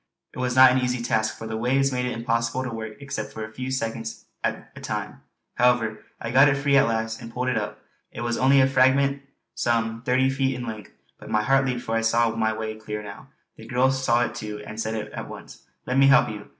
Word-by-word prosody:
It -, -, -9 dB
was 125 Hz, 0 st, -1 dB
not 130 Hz, 0 st, +8 dB
an 130 Hz, -, +2 dB
easy 125 Hz, -1 st, -1 dB
task, 110 Hz, -2 st, 0 dB
for -, -, -8 dB
the 110 Hz, 0 st, -4 dB
waves 135 Hz, +4 st, +2 dB
made 125 Hz, -1 st, -1 dB
it 125 Hz, -, -2 dB
impossible 115 Hz, +2 st, -1 dB
to 125 Hz, -, -4 dB
work 110 Hz, -1 st, -6 dB
except 140 Hz, -6 st, -5 dB
for 110 Hz, 0 st, -6 dB
a 110 Hz, -, -11 dB
few 130 Hz, +2 st, -5 dB
seconds 115 Hz, -3 st, -4 dB, 0.2 s
at -, -, -3 dB
a -, -, -10 dB
time; -, -, -5 dB, 0.4 s
however, 115 Hz, -3 st, +2 dB, 0.2 s
I 115 Hz, -, -4 dB
got 135 Hz, +3 st, +7 dB
it 135 Hz, -, +1 dB
free 140 Hz, 0 st, +2 dB
at -, -, +5 dB
last 110 Hz, -1 st, -2 dB
and 115 Hz, -, -9 dB
pulled 125 Hz, +2 st, -2 dB
it 125 Hz, -, 0 dB
up. -, -, -3 dB, 0.3 s
It -, -, -7 dB
was 120 Hz, 0 st, -1 dB
only 135 Hz, +2 st, +5 dB
a -, -, +5 dB
fragment 135 Hz, +1 st, +3 dB, 0.3 s
some 115 Hz, -1 st, 0 dB
thirty 130 Hz, +2 st, +2 dB
feet 135 Hz, -1 st, 0 dB
in 125 Hz, -1 st, -5 dB
length; 110 Hz, -3 st, -7 dB, 0.3 s
but -, -, -11 dB
my 105 Hz, 0 st, +1 dB
heart 135 Hz, +3 st, +3 dB
leaped 125 Hz, -2 st, -2 dB
for 115 Hz, -, -2 dB
I 115 Hz, -, +2 dB
saw 115 Hz, 0 st, +2 dB
my 110 Hz, -1 st, 0 dB
way 110 Hz, 0 st, -4 dB
clear 105 Hz, -1 st, -5 dB
now. 105 Hz, -, -10 dB, 0.3 s
The -, -, -12 dB
girl 130 Hz, +1 st, +2 dB
saw 130 Hz, -2 st, +2 dB
it -, -, -6 dB
too 105 Hz, -1 st, -6 dB
and 110 Hz, +1 st, -6 dB
said 110 Hz, 0 st, -2 dB, 0.2 s
at -, -, -6 dB
once: -, -, -12 dB, 0.2 s
"Let 130 Hz, +2 st, +1 dB
me 135 Hz, -, +6 dB
help 145 Hz, +2 st, +5 dB
you." 105 Hz, -1 st, -8 dB
120 Hz, 240 wpm, -24 LUFS, 110-130 Hz, 0.4 s, not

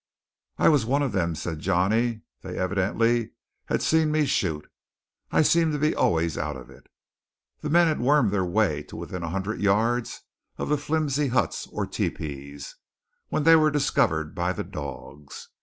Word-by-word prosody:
"I -, -, +3 dB
was 150 Hz, -6 st, +4 dB
one 140 Hz, +5 st, +1 dB
of 135 Hz, -, -1 dB
them," 85 Hz, -4 st, -1 dB
said 80 Hz, +1 st, -5 dB
Johnny. 105 Hz, +7 st, +1 dB, 0.2 s
"They -, -, -7 dB
evidently 105 Hz, +5 st, 0 dB, 0.3 s
have -, -, -1 dB
seen 160 Hz, -1 st, +2 dB
me 155 Hz, -1 st, +2 dB
shoot. 80 Hz, -, -1 dB, 0.6 s
I -, -, +4 dB
seem 165 Hz, +1 st, +3 dB
to -, -, 0 dB
be 155 Hz, +2 st, +1 dB
always 80 Hz, -1 st, +1 dB
out 75 Hz, -2 st, -3 dB
of 65 Hz, -, -12 dB
it." -, -, -18 dB, 0.7 s
The 150 Hz, -, -4 dB
men 170 Hz, +3 st, +5 dB
had 160 Hz, -2 st, 0 dB
wormed 130 Hz, -4 st, +3 dB
their 100 Hz, -2 st, +1 dB
way 90 Hz, -5 st, +1 dB
to -, -, -10 dB
within 90 Hz, -, -6 dB
a 85 Hz, -, -4 dB
hundred 95 Hz, +5 st, -3 dB
yards 115 Hz, +4 st, +1 dB, 0.3 s
of -, -, -4 dB
the 150 Hz, -, +2 dB
flimsy 150 Hz, -1 st, 0 dB
huts, 125 Hz, 0 st, -1 dB
or -, -, -3 dB
tepees, 70 Hz, -1 st, -5 dB, 0.5 s
when 155 Hz, -, -1 dB
they 165 Hz, +1 st, +7 dB
were 155 Hz, -1 st, +4 dB
discovered 125 Hz, -, +1 dB
by 90 Hz, +1 st, -1 dB
the -, -, -4 dB
dogs. 70 Hz, 0 st, -9 dB
110 Hz, 175 wpm, -25 LUFS, -, 0.7 s, they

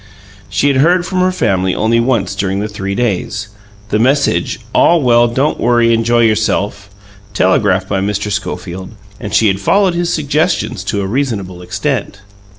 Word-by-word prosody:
She -, -, 0 dB
had 140 Hz, -2 st, +2 dB
heard 175 Hz, +6 st, +3 dB
from 185 Hz, 0 st, -2 dB
her 185 Hz, 0 st, +2 dB
family 95 Hz, -, 0 dB
only 115 Hz, +2 st, +1 dB
once 115 Hz, -6 st, 0 dB
during 95 Hz, 0 st, -2 dB
the 105 Hz, -, -2 dB
three 100 Hz, -2 st, -4 dB
days 105 Hz, -2 st, -2 dB, 0.4 s
the 105 Hz, -, 0 dB
message 130 Hz, -8 st, +1 dB
"All 170 Hz, -, +4 dB
well 120 Hz, -1 st, +4 dB
don't 135 Hz, +6 st, -1 dB
worry 120 Hz, -1 st, +3 dB
enjoy 115 Hz, +1 st, +2 dB
yourself" 105 Hz, -2 st, 0 dB, 0.5 s
telegraphed 95 Hz, 0 st, +2 dB
by 95 Hz, -1 st, 0 dB
Mr. 105 Hz, +1 st, -2 dB
Schofield, 95 Hz, -1 st, -5 dB, 0.2 s
and 105 Hz, -, -6 dB
she 110 Hz, -, +3 dB
had 95 Hz, -2 st, +2 dB
followed 195 Hz, -, +2 dB
his 175 Hz, 0 st, -1 dB
suggestions 155 Hz, +3 st, -1 dB
to 100 Hz, -, -1 dB
a -, -, -2 dB
reasonable 100 Hz, -6 st, -3 dB
extent. 95 Hz, +2 st, -3 dB
110 Hz, 160 wpm, -14 LUFS, 100-135 Hz, 0.5 s, All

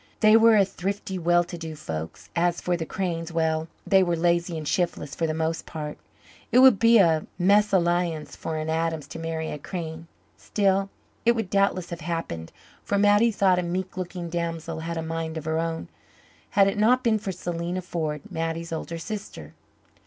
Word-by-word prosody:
They 215 Hz, 0 st, +7 dB
were 225 Hz, -1 st, +7 dB
a 200 Hz, -, +5 dB
thrifty, 190 Hz, 0 st, -4 dB
well 175 Hz, +1 st, +3 dB
to 175 Hz, 0 st, -8 dB
do 160 Hz, -1 st, -6 dB
folk. 80 Hz, -, -6 dB, 0.2 s
As 175 Hz, 0 st, +1 dB
for 180 Hz, -, 0 dB
the 165 Hz, -2 st, -4 dB
Cranes 170 Hz, -3 st, -3 dB
well, 160 Hz, -1 st, 0 dB, 0.2 s
they 195 Hz, -1 st, +5 dB
were 175 Hz, -2 st, +1 dB
lazy 170 Hz, 0 st, +1 dB
and 155 Hz, -2 st, -5 dB
shiftless, 170 Hz, -5 st, -1 dB
for 165 Hz, -, -1 dB
the 155 Hz, -, -1 dB
most 160 Hz, +1 st, -2 dB
part. 150 Hz, -2 st, -6 dB, 0.5 s
It -, -, +4 dB
would 255 Hz, -6 st, +7 dB
be 230 Hz, +2 st, +6 dB
a 165 Hz, -6 st, +3 dB
mésalliance 175 Hz, -4 st, +2 dB
for 160 Hz, -1 st, -4 dB
an 155 Hz, 0 st, -3 dB
Adams 160 Hz, -2 st, -1 dB
to 165 Hz, -, -7 dB
marry 160 Hz, -1 st, -3 dB
a 150 Hz, -, -5 dB
Crane. 165 Hz, 0 st, -6 dB, 0.3 s
Still, 195 Hz, -1 st, +1 dB, 0.3 s
it 235 Hz, -, +5 dB
would 225 Hz, -5 st, -3 dB
doubtless 195 Hz, -3 st, +1 dB
have 170 Hz, 0 st, -5 dB
happened 155 Hz, -, -4 dB, 0.3 s
for 200 Hz, -, 0 dB
Mattie, 205 Hz, +3 st, +5 dB
though 200 Hz, -3 st, +3 dB
a 180 Hz, -, +2 dB
meek 180 Hz, +2 st, -3 dB
looking 180 Hz, -1 st, -5 dB
damsel, 165 Hz, -1 st, -3 dB
had 165 Hz, +1 st, -4 dB
a 165 Hz, -, -2 dB
mind 165 Hz, 0 st, -3 dB
of 155 Hz, -, -6 dB
her 160 Hz, 0 st, 0 dB
own 165 Hz, 0 st, -3 dB, 0.7 s
had 195 Hz, -1 st, +7 dB
it 195 Hz, -, -1 dB
not 250 Hz, +4 st, +4 dB
been 220 Hz, -2 st, +2 dB
for 200 Hz, -2 st, -4 dB
Selena 175 Hz, 0 st, -4 dB
Ford, 155 Hz, -4 st, -3 dB
Mattie's 165 Hz, +1 st, -3 dB
older 165 Hz, +1 st, -4 dB
sister. 165 Hz, -, -7 dB
170 Hz, 190 wpm, -25 LUFS, 160-195 Hz, 0.7 s, They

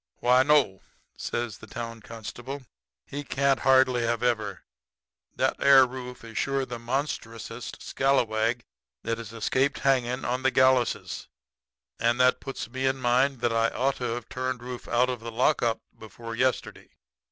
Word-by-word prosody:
"'Why, 125 Hz, +1 st, +4 dB
no,' 135 Hz, -9 st, +3 dB, 0.3 s
says 120 Hz, -3 st, -4 dB
the 110 Hz, -, -12 dB
town 115 Hz, 0 st, -6 dB
constable, 120 Hz, +5 st, -7 dB, 0.4 s
'he 145 Hz, +1 st, -6 dB
can't 140 Hz, 0 st, +1 dB
hardly 130 Hz, -2 st, +4 dB
have 115 Hz, 0 st, 0 dB
ever. 110 Hz, -5 st, -1 dB, 0.7 s
That -, -, +1 dB
air 135 Hz, -1 st, +8 dB
Rufe 125 Hz, -1 st, -8 dB
is 115 Hz, -1 st, -5 dB
shore 135 Hz, -1 st, 0 dB
the 120 Hz, -2 st, -6 dB
monstrousest 115 Hz, -2 st, -4 dB
scalawag 120 Hz, -3 st, +1 dB, 0.4 s
that 115 Hz, 0 st, -2 dB
has 115 Hz, -2 st, -8 dB
escaped 130 Hz, +5 st, 0 dB
hangin' 130 Hz, -2 st, +1 dB
on 125 Hz, +1 st, -1 dB
the 130 Hz, -, +3 dB
galluses. 130 Hz, -2 st, +2 dB, 0.7 s
And 120 Hz, +2 st, +2 dB
that 125 Hz, 0 st, +4 dB
puts 135 Hz, -4 st, -6 dB
me 130 Hz, +2 st, -2 dB
in 135 Hz, 0 st, +1 dB
mind 130 Hz, +1 st, +2 dB
that 120 Hz, -1 st, +1 dB
I 115 Hz, 0 st, +3 dB
ought 135 Hz, +4 st, 0 dB
to 120 Hz, -2 st, -2 dB
have 120 Hz, -2 st, -7 dB
turned 130 Hz, -1 st, -3 dB
Rufe 125 Hz, 0 st, -7 dB
out 125 Hz, +2 st, +2 dB
of 125 Hz, -, -4 dB
the 115 Hz, +1 st, -7 dB
lockup 120 Hz, -1 st, +2 dB, 0.2 s
before 115 Hz, +2 st, -9 dB
yesterday. 130 Hz, +2 st, -1 dB
125 Hz, 155 wpm, -27 LUFS, 115-130 Hz, 0.7 s, air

